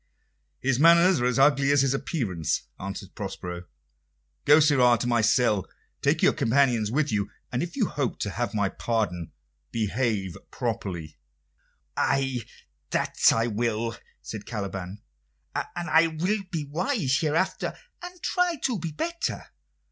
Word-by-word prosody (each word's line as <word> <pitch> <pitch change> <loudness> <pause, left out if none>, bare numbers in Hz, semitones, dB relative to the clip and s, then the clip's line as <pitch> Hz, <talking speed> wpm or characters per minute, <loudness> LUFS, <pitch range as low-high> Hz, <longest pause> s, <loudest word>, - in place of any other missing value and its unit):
"His 130 -1 +1
manners 170 0 +6
are 125 - +2
as 125 - 0
ugly 140 0 +4
as 145 -1 +4
his 135 -1 +2
appearance," 95 - -2 0.2
answered 95 -1 -6
Prospero. 90 -3 -6 0.8
"Go, 150 +2 +7
sirrah, 130 -6 +5
to - - -2
my 120 -1 +2
cell. 110 -3 +2 0.3
Take - - +1
your - - +5
companions 120 -3 +2
with 145 +5 0
you, 100 -2 0 0.2
and 125 - -1
if 175 +1 -4
you 250 -6 +2
hope 140 -8 -2
to 100 - -1
have 120 +2 -3
my 100 -2 +2
pardon, 95 -6 -2 0.4
behave 110 -4 -1
properly." 95 -10 -4 0.8
"Ay, 135 -2 +1 0.5
that - - -1 0.2
I 115 0 +1
will," 115 0 -1 0.3
said 105 -2 -7
Caliban; 100 -2 -5 0.5
"and 175 0 -4
I 165 0 +5
will 180 +7 -1
be 165 -4 -2
wise 155 - 0
hereafter, 165 +4 -1 0.2
and 355 0 -10
try 360 -2 +1
to 245 -6 0
be 165 0 -4
better. 335 - -3
125 Hz, 140 wpm, -26 LUFS, 105-155 Hz, 0.8 s, Go